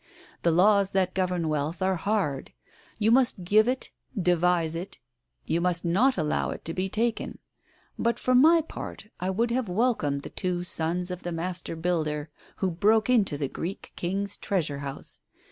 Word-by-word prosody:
The 170 - +3
laws 195 +3 +4
that 185 -1 +1
govern 180 -3 0
wealth 155 +2 -1
are 190 0 +2
hard. 170 -6 -1 0.4
You 220 0 +2
must 245 -6 +3
give 215 +5 +4
it, 255 +1 -1 0.3
devise 175 -2 +2
it, 175 +3 -6 0.5
you 170 - 0
must 175 -1 +1
not 210 +10 +3
allow 155 -3 0
it - - -7
to 165 - -3
be 190 +2 -2
taken. 225 +3 -1 0.6
But 235 0 +1
for 255 - 0
my 320 +6 +6
part 295 -7 -8
I 185 - -1
would 230 +5 0
have 245 -4 -1
welcomed 180 - 0
the - - -8
two 180 -1 -2
sons 175 +1 -1
of 180 - -5
the 175 - -4
master 170 0 -3
builder 155 -3 -1 0.2
who 190 -2 -1
broke 215 +7 +3
into 200 -11 +2
the 140 -1 -1
Greek 175 +8 -6
King's 195 +3 -2
Treasure 155 -8 -1
House. 140 -1 -7
180 Hz, 170 wpm, -27 LUFS, 165-210 Hz, 0.6 s, my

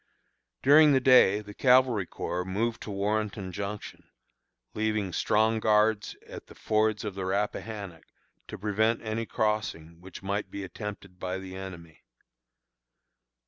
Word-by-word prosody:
During 145 +2 +7
the 135 - +5
day 125 -6 +5
the 105 0 -11
Cavalry 125 -6 +3
Corps 90 +1 -3
moved 110 +6 -2
to - - -7
Warrenton 100 -1 -2
Junction, 100 +2 -6 0.6
leaving 105 -3 -1
strong 110 +4 +2
guards 105 0 +2
at - - -10
the - - -14
fords 110 -1 0
of 105 - -3
the 95 0 -5
Rappahannock 100 -2 -3 0.4
to - - -7
prevent 110 +3 0
any 110 +1 -3
crossing 85 -7 -2
which 95 +1 -11
might 100 +2 -2
be 100 - -6
attempted 100 -1 -8
by 90 +1 -3
the 95 -1 -8
enemy. 90 -4 -9
105 Hz, 135 wpm, -28 LUFS, 95-110 Hz, 0.6 s, During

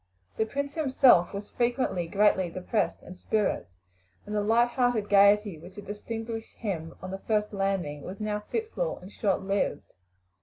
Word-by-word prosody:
The 220 - +1
prince 280 +4 -3
himself 265 - +5
was 200 +1 -7
frequently 240 -8 0
greatly 190 -1 +3
depressed 185 +5 -1
in 180 - -9
spirits, 185 - -1 0.5
and 210 - -6
the 210 - +1
light 230 +3 +3
hearted 240 -4 +1
gaiety 200 -3 +5
which 180 +4 -13
had 205 - -9
distinguished 225 +2 -6
him 170 -8 -4
on 185 - -5
the 195 - -5
first 210 0 0
landing 195 -7 -1
was 190 +6 -8
now 210 -1 -1
fitful 450 - -3
and 185 +2 -12
short 195 -3 0
lived. 195 -6 -1
210 Hz, 160 wpm, -28 LUFS, 190-230 Hz, 0.5 s, himself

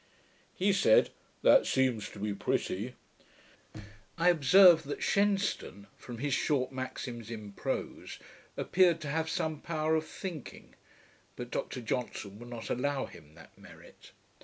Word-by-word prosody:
"' - - -34
He 200 0 +4
said, 190 - +4 0.3
'That - - +6
seems 130 -5 +1
to - - -13
be 105 +1 -2
pretty.' 105 +4 -2 1.2
I 170 +1 +4
observed 175 +1 +6
that 145 - -4
Shenstone, 200 - 0
from 120 -2 -9
his 140 +3 -2
short 130 -3 +1
maxims 125 -3 -6
in 105 -3 -7
prose, - - -4 0.4
appeared 175 -3 +3
to 150 - -5
have 160 +2 -1
some 160 -2 -2
power 155 -1 -1
of 160 0 0
thinking; 170 -8 -8 0.6
but 120 0 -7
Dr 125 - -4
Johnson 110 -3 -4
would 120 +1 -10
not 120 -2 -6
allow 140 +2 -1
him 75 -2 -15
that 80 -3 -16
merit. - - -16
130 Hz, 140 wpm, -31 LUFS, 115-160 Hz, 1.2 s, That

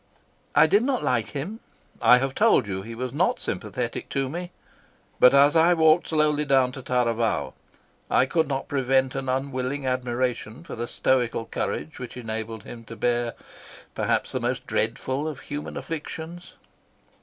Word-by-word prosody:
"I - - +7
did 205 - +4
not 255 0 0
like 115 -3 +1
him, 180 +11 -4 0.4
I 125 - +7
have 135 +1 -1
told 205 - +4
you 95 -1 -3
he 115 +3 -8
was 125 +1 -4
not - - +1
sympathetic - - -4
to 135 -1 -1
me, 175 +4 -5 0.7
but 125 - +8
as 140 +3 +5
I 170 +2 +5
walked 160 +1 +4
slowly 150 -1 +2
down 135 -3 +3
to 135 - -8
Taravao 115 - 0 0.6
I - - +4
could 160 +3 +1
not 135 -1 -3
prevent 135 -1 +1
an 135 -1 -3
unwilling 135 +1 -2
admiration 125 0 -2
for - - -7
the 120 +1 -4
stoical 120 -3 0
courage 80 -7 -4
which 125 0 -7
enabled 110 -2 -5
him 115 0 -10
to 115 - -9
bear 120 +1 0 0.6
perhaps - - 0
the - - -2
most - - -2
dreadful 135 +4 -1
of 150 -4 -5
human 145 +1 -6
afflictions. 165 +2 -6
130 Hz, 160 wpm, -25 LUFS, 120-150 Hz, 0.7 s, but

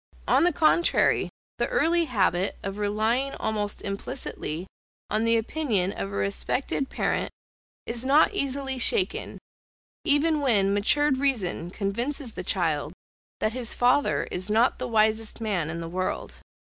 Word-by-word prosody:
on - - +4
the 355 - +4
contrary, 325 +2 +3 0.3
the - - +1
early 335 +1 +2
habit 190 - 0
of 195 +1 -5
relying 220 +6 0
almost 210 -1 -2
implicitly 185 -4 -4 0.5
on 215 +2 +2
the 230 0 +4
opinion 225 -6 0
of 100 - -5
a - - -6
respected 100 - -1
parent - - -1 0.6
is 235 +1 -3
not 285 +8 +4
easily 275 -5 -2
shaken, 375 - 0 0.7
even 305 +1 +3
when 200 -8 +3
matured 265 +7 +3
reason 215 -11 0
convinces 235 - -2
the 180 - -5
child 165 -4 0 0.5
that 215 - +1
his 245 -2 -2
father 250 +4 +2
is 185 +3 -3
not 225 +4 +3
the 255 - -3
wisest 220 -1 +1
man 195 -8 -1
in 170 +1 -4
the 165 - -5
world. 185 +2 -3
225 Hz, 140 wpm, -26 LUFS, 195-275 Hz, 0.7 s, on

